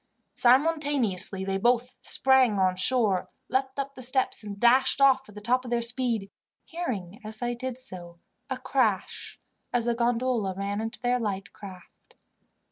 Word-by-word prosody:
Simultaneously 255 - +2
they 195 0 -2 0.4
sprang 260 -5 +4
on 185 -1 +2
shore, 205 -1 +1 0.2
leaped 265 +1 -1
up 275 0 -4
the 260 - -11
steps, 255 -1 +1
and 200 -1 -8
dashed 260 +4 +4
off 265 -3 +4
at 210 - -15
the 210 - -9
top 250 +4 +1
of 250 - -8
their 240 0 +1
speed, 235 -4 0 0.3
hearing, 215 - -5
as 215 +1 -6
they 240 0 -2
did 255 0 -5
so, 180 -9 -10 0.3
a 260 - -3
crash 245 -7 -2 0.3
as 240 -2 0
the 240 - +1
gondola 235 -4 0
ran 200 +1 -3
into 225 +1 -5
their 250 0 +1
light 200 -4 -4
craft. 185 -4 -14
240 Hz, 155 wpm, -26 LUFS, 200-260 Hz, 0.4 s, sprang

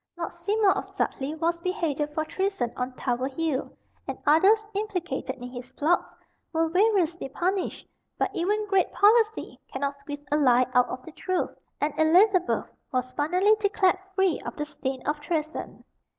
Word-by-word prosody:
Lord 335 - -4
Seymour 400 +4 +2
of - - -3
Sudleye, 290 +4 -3
was 335 +1 0
beheaded 305 -5 -2
for 315 - 0
treason 375 -8 -1
on 250 +1 -2
Tower 255 0 -1
Hill, 285 0 -2 0.4
and - - -4
others, 385 +9 +5
implicated 360 -10 -3
in 250 -1 -9
his 250 0 -8
plots, 320 +6 +1 0.4
were 325 0 +1
variously 360 -5 +2
punished; 365 +6 -2 0.3
but - - 0
even 420 +5 0
"great 390 -2 +2
policy" 440 +1 +3
cannot 280 +1 -3
squeeze 290 +1 -8
a 295 - +3
lie 255 -3 +5
out 250 -1 +4
of 255 0 -6
the 325 - -9
truth, 370 +3 -2 0.3
and 295 +1 0
Elizabeth 360 +3 +4 0.3
was 255 0 -1
finally 360 +10 +3
declared 400 -3 +2 0.2
free 380 -5 +2
of - - -7
the 295 - -3
stain 270 -3 -5
of 295 0 -1
treason. 310 +1 -4
320 Hz, 160 wpm, -26 LUFS, 280-380 Hz, 0.4 s, others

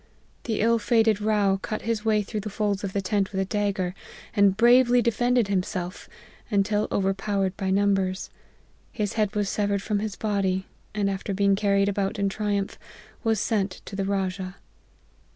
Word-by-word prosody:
The 220 -3 -1
ill 230 +1 +3
fated 220 -1 +2
Rao 205 -2 +2
cut 215 +2 -5
his 225 -1 -1
way 215 -2 +2
through 210 +2 -4
the 210 - -5
folds 205 -1 -1
of 195 - -2
the 195 0 -2
tent 200 0 0
with 190 - -2
a 195 - +1
dagger, 195 -3 -1 0.4
and 200 -2 +4
bravely 245 +1 +6
de 235 0 +2
fended 245 0 +2
himself 185 -1 -3 0.4
until 210 0 +1
overpowered 195 0 0
by 190 -1 -2
numbers; 195 -1 +1 0.6
his 210 -3 -2
head 215 -1 0
was 205 -1 0
severed 200 0 0
from 210 -2 0
his 210 -2 -3
body, 195 -3 -1 0.3
and 205 -1 +1
after 195 0 -2
being 200 0 +3
carried 200 0 +2
about 200 +1 -1
in 200 -1 +1
triumph, 200 -1 -2 0.4
was 225 -3 +2
sent 200 -3 -1
to 195 - -8
the 195 0 -1
Rajah. 190 -1 -2
200 Hz, 170 wpm, -25 LUFS, 195-215 Hz, 0.6 s, bravely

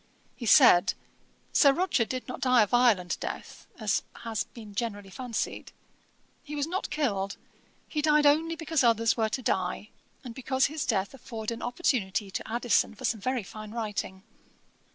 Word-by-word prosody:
He 235 - -6
said, 190 0 +6 0.6
'Sir 280 - +6
Roger 340 -8 +1
did 255 +2 -5
not 255 - -7
die 255 -4 +5
a - - +2
violent 215 -6 +2
death, - - -7
as - - +1 0.2
has 225 -2 -2
been 215 -3 -12
generally 205 -3 -4
fancied. 245 +2 -4 0.7
He 300 -1 -8
was 290 -1 0
not 365 +4 -3
killed; 200 -10 -1 0.5
he 300 - -2
died 300 0 +4
only 320 +3 +3
because 320 -3 0
others 230 -1 +3
were 220 -2 0
to 255 +3 -3
die, 190 +1 -1 0.3
and 245 -3 -7
because 260 +1 0
his 305 0 -3
death 200 -1 0
afforded 230 -3 -5
an 230 - -8
opportunity 220 - -1
to 220 - -5
Addison 235 -1 +1
for - - -7
some 220 -3 0
very 255 0 -1
fine 215 +2 -9
writing. 210 -4 -4
235 Hz, 165 wpm, -28 LUFS, 210-270 Hz, 0.7 s, said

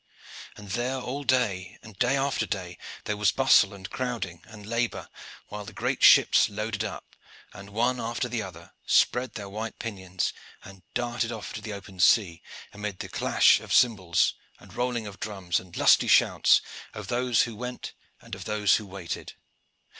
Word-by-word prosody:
And 100 -2 -10
there 125 +5 -1
all 130 +3 -5
day, 100 -9 0
and 110 -2 -13
day 125 +3 +2
after 135 0 0
day, 90 -4 -5 0.2
there 105 - -2
was 105 0 +3
bustle 135 -6 +5
and 95 -2 -9
crowding 120 -10 -4
and 105 -2 -12
labor, 115 +2 -2 0.4
while 105 0 -6
the - - -10
great - - -2
ships - - +7
loaded 110 +1 -3
up, - - -7 0.4
and 100 -1 -11
one 120 +4 0
after 120 +2 -2
the 120 -2 -3
other 95 -3 -10 0.2
spread 125 +1 +2
their 100 -3 -6
white 110 +3 -6
pinions 95 -5 -3 0.3
and 95 -2 -13
darted 120 -1 -1
off 110 -5 -7
to 110 - -6
the 105 -1 -6
open 95 -2 -10
sea, 90 -2 +4 0.3
amid 105 -2 -5
the - - -7
clash - - +4
of - - -11
cymbals 95 -8 +3 0.2
and - - -16
rolling 120 -2 -2
of 100 -2 -9
drums 95 -5 -2
and 90 -2 -12
lusty - - +5
shouts - - +5 0.3
of - - -7
those 125 -1 +2
who 115 -2 -5
went 125 +3 -6 0.3
and - - -15
of - - -6
those 105 -2 +3
who 105 - -8
waited. 95 -3 -6
105 Hz, 175 wpm, -27 LUFS, 100-120 Hz, 0.4 s, ships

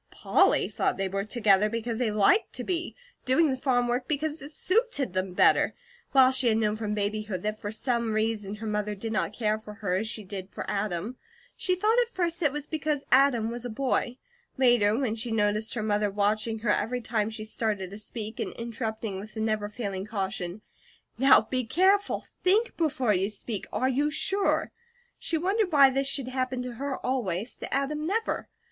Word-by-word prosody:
Polly - - +3
thought - - -1
they 195 0 -1
were 195 +1 -2
together 210 -3 +3
because 230 +1 -3
they 245 -3 +1
liked 215 - +3
to - - -3
be; 350 -2 -2 0.3
doing 290 +4 +3
the - - 0
farm 250 -2 +1
work 245 +1 -1
because 310 +1 -1
it 280 - -8
suited 370 - 0
them 185 0 -2
better; - - +4 0.4
while 260 -1 +6
she 260 -1 +4
had 220 -1 +3
known 215 -1 +1
from 215 -1 -3
babyhood 210 -2 -2
that 215 0 -2
for 205 - -4
some 235 0 -1
reason 215 -2 -1
her 220 +2 -8
mother 210 -1 -2
did 220 +3 -4
not 215 - 0
care 215 -1 -1
for 210 -1 -11
her 205 -4 -2
as 220 +3 -2
she 220 -1 -3
did 190 -1 -7
for - - -6
Adam. 205 +3 -2 0.4
She 365 - 0
thought 430 +6 +2
at 485 - +2
first 345 -5 -1
that 325 - +3
it - - -4
was 295 0 -5
because 300 -2 -2
Adam 250 -5 +4
was 240 0 -6
a 245 - -4
boy. 250 +1 -1 0.4
Later, 240 -5 +4
when 250 -5 0
she 230 +1 -3
noticed 215 +1 0
her 220 - -2
mother 210 -1 +1
watching 210 +3 0
her - - +4
every 240 +4 0
time 220 -2 -1
she 220 -1 -6
started 210 -4 -2
to 205 - -8
speak, 215 0 -5
and - - -3
interrupting 225 -3 -4
with 210 +2 -10
the - - -4
never 215 -1 -1
failing 200 -3 -4
caution: 195 -2 -4 0.6
"Now 270 -2 +7
be 255 +3 -2
careful! 380 - +2 0.2
THINK 430 +6 +2
before 265 -9 +1
you 190 +1 +1
speak! 210 0 -5
Are 255 - 0
you 280 +3 +1
SURE?" 385 +6 +1 0.5
she 330 - -1
wondered 385 +3 0
why 280 -3 +7
this 270 +1 0
should 275 -2 0
happen 255 -1 -2
to 245 -2 -7
her 280 -1 -2
always, 225 -5 -2
to - - -7
Adam 300 +3 -1
never. 445 +5 -1
230 Hz, 200 wpm, -27 LUFS, 210-275 Hz, 0.6 s, Now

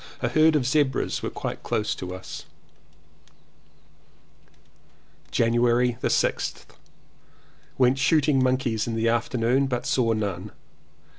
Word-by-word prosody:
A - - +1
herd 155 0 +4
of 140 -4 +1
zebras 140 0 0
were - - -3
quite - - -5
close 105 - -1
to 90 0 -7
us. 95 - -9 2.8
January 120 +1 +2
6th. - - 0 1.1
Went 130 +1 +3
shooting 145 -1 +3
monkeys 130 -4 0
in 115 - -2
the 115 +1 0
afternoon, 120 +3 +1
but 125 -2 -3
saw 115 -3 +1
none. 100 -2 -4
125 Hz, 105 wpm, -25 LUFS, 115-135 Hz, 2.8 s, herd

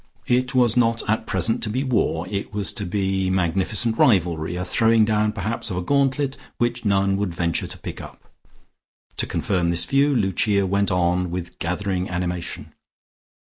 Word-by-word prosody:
It 125 +1 +1
was 120 -3 +4
not 115 -2 +2
at 110 +1 0
present 115 +2 0
to 105 - -2
be 130 +5 -1
war; 105 - 0
it 100 0 -4
was 100 -2 -2
to 105 -5 -4
be 95 0 0
magnificent 95 +5 0
rivalry, 85 -6 +2
a 90 +1 -3
throwing 110 +3 +4
down 105 0 +1
perhaps 110 +2 -3
of 90 - -3
a 90 - -2
gauntlet, 140 +2 +1 0.2
which 120 0 -1
none 100 -2 +2
would 100 -4 -2
venture 85 -1 -1
to - - -9
pick - - -7
up. - - -12 0.9
To - - -1
confirm 90 -4 0
this 85 0 0
view, 140 +1 +3
Lucia 100 -1 +1
went 100 +1 +1
on 90 0 +1
with 90 0 -6
gathering 90 +1 -2
animation. 90 -1 -4
100 Hz, 170 wpm, -23 LUFS, 90-115 Hz, 0.9 s, was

